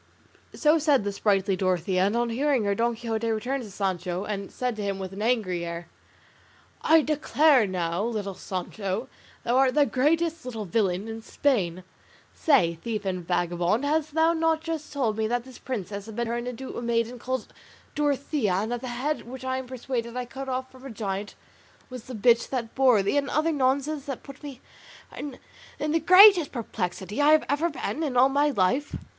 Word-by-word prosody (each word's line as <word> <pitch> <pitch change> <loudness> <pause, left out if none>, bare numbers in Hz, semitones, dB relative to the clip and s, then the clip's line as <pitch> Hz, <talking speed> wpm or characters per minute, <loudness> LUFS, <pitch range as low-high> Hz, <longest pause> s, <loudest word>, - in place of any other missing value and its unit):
So 310 +1 +3
said 290 -6 +3
the 205 - -2
sprightly 195 -1 +1
Dorothea, 185 0 +1
and 205 - -1
on 240 -1 0
hearing 270 0 +1
her 200 0 +1
Don 235 +3 0
Quixote 225 -1 -2
turned 265 +4 -2
to 220 - -8
Sancho, 185 -2 -2
and 200 -2 -5
said 250 -2 -2
to - - -4
him, 200 -1 -2
with 190 -1 -6
an 200 - -6
angry 215 -7 0
air, 170 0 -6 0.9
"I 320 -1 +5
declare 300 -4 +3
now, 175 -1 -2
little 215 -4 -3
Sancho, 195 +5 -4 0.3
thou 240 +2 +1
art 265 0 +3
the 295 -1 +5
greatest 320 +5 +1
little 225 -4 -5
villain 195 0 0
in 225 0 -6
Spain. 185 -10 0 0.5
Say, 170 - +2
thief 220 -3 -3
and 185 -2 -2
vagabond, 175 +6 0
hast 305 0 0
thou 325 +1 +4
not 325 -1 +1
just 320 -3 -5
now 285 - -2
told 220 -2 0
me 220 0 0
that 240 +1 -1
this 260 -1 -13
princess 205 -4 -5
had 220 - -9
been 235 +1 -1
turned 235 +1 -3
into 250 +1 -6
a - - -4
maiden 235 +1 -1
called 260 +1 -4 0.4
Dorothea, 280 - 0
and 210 +5 -1
that 245 -1 -2
the 260 - -5
head 255 +3 -3
which 260 +1 -8
I 260 0 -1
am 260 - -8
persuaded 245 -1 -4
I 250 - -2
cut 270 +2 -7
off 260 0 -3
from 260 0 -16
a 270 - -7
giant 205 -3 -4 0.6
was 250 -3 -8
the 255 - -7
bitch 235 +2 +3
that 240 -4 -3
bore 255 -6 +4
thee, 200 +9 +1
and 280 -1 0
other 310 +2 +1
nonsense 280 +1 0
that 275 -3 -6
put 275 -1 -12
me 280 -4 -9 0.5
in 280 -3 -6 0.5
the 330 - +2
greatest 365 0 +8
perplexity 205 -1 -3
I 300 +1 +6
have 310 - +4
ever 300 +4 +1
been 305 +1 -4
in 280 -6 -1
all 260 +2 +6
my 285 +2 +2
life? 260 +5 0
240 Hz, 195 wpm, -26 LUFS, 200-280 Hz, 0.9 s, greatest